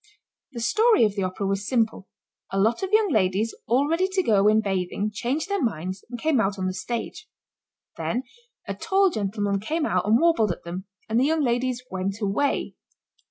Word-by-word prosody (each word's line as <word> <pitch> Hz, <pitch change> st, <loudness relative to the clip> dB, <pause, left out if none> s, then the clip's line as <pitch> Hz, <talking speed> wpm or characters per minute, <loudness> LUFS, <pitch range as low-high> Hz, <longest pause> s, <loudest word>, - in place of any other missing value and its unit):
The 235 Hz, -, -5 dB
story 435 Hz, -, +4 dB
of 210 Hz, -, 0 dB
the 200 Hz, -, -1 dB
Opera 185 Hz, +2 st, -2 dB
was 195 Hz, +1 st, -1 dB
simple. 225 Hz, -6 st, 0 dB, 0.4 s
A 195 Hz, -, 0 dB
lot 225 Hz, +4 st, +2 dB
of 385 Hz, 0 st, -3 dB
young 430 Hz, -3 st, +3 dB
ladies 205 Hz, 0 st, +1 dB
all 260 Hz, +5 st, +3 dB
ready 335 Hz, +4 st, +1 dB
to 380 Hz, 0 st, 0 dB
go 205 Hz, -, +3 dB
in 215 Hz, +1 st, +5 dB
bathing 195 Hz, 0 st, -1 dB
changed 250 Hz, -, -2 dB
their 400 Hz, -2 st, -1 dB
minds 185 Hz, -4 st, -3 dB
and 245 Hz, -, -5 dB
came 290 Hz, -3 st, +2 dB
out 195 Hz, 0 st, -1 dB
on 190 Hz, -, -2 dB
the 185 Hz, -, -1 dB
stage. 240 Hz, -, -5 dB, 0.7 s
Then 245 Hz, +3 st, -2 dB, 0.4 s
a -, -, -2 dB
tall 385 Hz, -1 st, +2 dB
gentleman 205 Hz, -2 st, -1 dB
came 310 Hz, +10 st, -1 dB
out -, -, 0 dB
and 220 Hz, +3 st, +5 dB
warbled 295 Hz, -, +3 dB
at -, -, -7 dB
them 180 Hz, +3 st, -6 dB, 0.2 s
and 225 Hz, +2 st, +1 dB
the 260 Hz, -, +3 dB
young 315 Hz, +1 st, +1 dB
ladies 245 Hz, 0 st, 0 dB
went 190 Hz, +2 st, -3 dB
away. 205 Hz, +7 st, 0 dB
225 Hz, 195 wpm, -25 LUFS, 195-290 Hz, 0.7 s, in